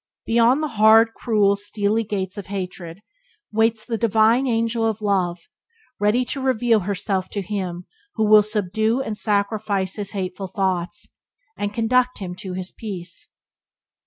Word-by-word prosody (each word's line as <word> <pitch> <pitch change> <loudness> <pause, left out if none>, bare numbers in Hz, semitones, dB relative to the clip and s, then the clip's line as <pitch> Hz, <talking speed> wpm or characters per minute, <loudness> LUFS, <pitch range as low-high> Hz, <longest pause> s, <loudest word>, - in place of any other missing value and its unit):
Beyond 235 +6 +3
the - - 0
hard, 225 +1 +6
cruel, 210 -4 +2
steely 205 +2 -1
gates 195 -2 -3
of 205 -3 -7
hatred 185 -2 -6 0.5
waits 220 0 +1
the 230 -3 -3
divine 225 +3 +3
angel 230 -1 0
of 220 -1 0
love, 185 -5 -1 0.5
ready 210 +5 +2
to 275 +2 -4
reveal 245 -3 +2
herself 190 -1 -2
to 200 - -4
him 180 -3 -4 0.3
who 220 - +1
will 210 0 +7
subdue 215 +3 0
and 220 - -4
sacrifice 205 -2 -1
his 205 -1 -3
hateful 190 0 -4
thoughts, 190 0 -2 0.5
and 205 0 -3
conduct 250 +3 +1
him 185 -3 -6
to 190 -2 -6
his 185 0 -5
peace. 180 -6 -7
210 Hz, 145 wpm, -22 LUFS, 190-225 Hz, 0.5 s, will